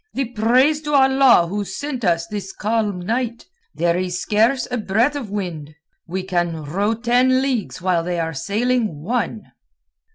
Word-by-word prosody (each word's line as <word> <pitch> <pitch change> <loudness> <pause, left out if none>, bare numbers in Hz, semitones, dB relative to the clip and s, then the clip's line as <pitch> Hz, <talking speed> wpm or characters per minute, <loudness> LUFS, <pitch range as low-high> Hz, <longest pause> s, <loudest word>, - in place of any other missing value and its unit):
"The 270 -3 -1
praise 250 +7 +3
to 295 -1 -4
Allah 265 -7 +5
who 205 +4 -3
sent 255 +6 -5
us 170 -3 +1
this 195 +1 -6
calm 210 -3 -1
night. 235 +4 -2 0.3
There 170 0 +1
is 180 -1 -2
scarce 230 +5 +1
a 245 - -1
breath 225 +8 +1
of 260 -7 -5
wind. 170 -7 -5 0.3
We 185 +2 -3
can 175 -4 -2
row 200 +9 -1
ten 245 +3 +3
leagues 240 -9 -2
while 180 -3 +1
they 175 0 -2
are 165 0 -2
sailing 210 - -1
one." 225 +1 -3
210 Hz, 160 wpm, -20 LUFS, 180-250 Hz, 0.3 s, Allah